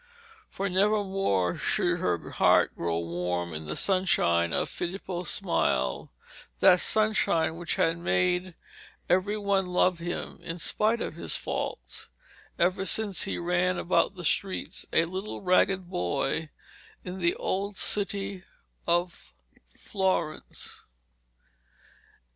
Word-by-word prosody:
For 195 - -3
never 205 +3 +2
more 100 - 0
should - - +1
her - - -2
heart - - +4
grow 85 -1 -1
warm 85 0 -3
in 80 0 -6
the 75 - -2
sunshine 160 - +2
of - - 0
Filippo's 180 0 -4
smile 65 - 0 0.5
that 180 - +6
sunshine 215 -8 +2
which 170 0 -2
had 165 +1 +1
made 180 0 0 0.5
every 190 +4 +1
one 200 -2 +1
love 180 -1 +2
him, 175 +1 -5
in 165 - -5
spite 215 +6 +1
of - - -3
his - - 0
faults, - - -4 0.5
ever 185 +2 +1
since 205 -1 +1
he - - -3
ran 180 +1 +1
about 185 +3 +1
the 180 - -8
streets, 190 +4 -1
a 165 - +3
little 190 +4 -5
ragged 185 0 +2
boy, 135 - -2 0.5
in 185 +1 -6
the 170 -1 +1
old 200 +1 -2
city 200 -2 0 0.4
of 170 - -1 0.4
Florence. 190 -6 -3
180 Hz, 120 wpm, -28 LUFS, 165-195 Hz, 0.5 s, that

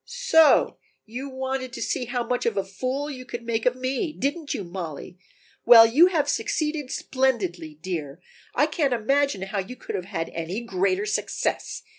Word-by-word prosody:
"So 470 -11 +4 0.3
you 255 +5 -6
wanted 260 -1 -4
to - - -6
see 260 -4 -2
how 245 0 -2
much 245 0 -1
of 230 - -1
a 195 - +1
fool 255 +9 -3
you 265 -4 -7
could 240 -1 -7
make 230 0 0
of 250 - +2
me, 260 +5 -2
didn't 290 +2 -3
you, 200 - -2
Mollie? 175 -1 -7 0.4
Well, 230 -1 +9
you 285 +10 +6
have 330 -6 +1
succeeded 300 -3 -1
splendidly, 190 - -1
dear; 160 -5 -4 0.4
I 295 - +4
can't 300 -4 0
imagine 270 -2 +1
how 195 +1 -3
you 195 +7 -5
could - - -8
have 180 - -3
had 175 -4 -4
any 170 +7 -4
greater 195 -2 0
success!" 215 - -2
245 Hz, 175 wpm, -25 LUFS, 195-275 Hz, 0.4 s, Well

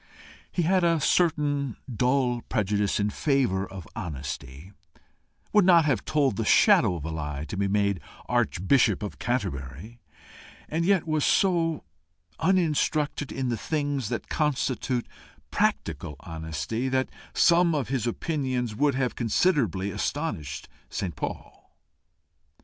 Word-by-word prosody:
He 175 - 0
had 185 +2 +3
a 165 -1 +3
certain 145 -5 +1
dull 125 0 +1
prejudice 105 -3 0
in 105 0 +1
favour 125 -11 +1
of 95 -3 -9
honesty, 70 0 -6 0.8
would 210 -1 +6
not 170 -3 +6
have 135 -8 0
told 140 -9 +1
the - - 0
shadow 90 - +5
of 80 -3 -6
a 80 - -3
lie 75 -2 -4
to 100 - -6
be 100 0 0
made 100 -3 +1 0.3
Archbishop 105 +1 +2
of 105 - -6
Canterbury, 100 - -3 0.7
and 165 +2 -1
yet 190 -3 +3
was 155 -2 +1
so 165 -5 +2 0.6
uninstructed 155 -5 +1
in 130 -2 -2
the 120 - -1
things 145 -3 -2
that - - -4
constitute 130 -4 -1 0.5
practical 75 - -1
honesty 80 - -4
that 130 0 0 0.3
some 170 -1 +4
of 140 -5 -2
his 125 -3 -1
opinions 130 -3 -2
would 145 +2 +2
have 130 -2 0
considerably 115 - +1
astonished 70 -5 -3 0.2
St. 90 -4 -4
Paul. - - -7
125 Hz, 125 wpm, -26 LUFS, 95-150 Hz, 0.8 s, would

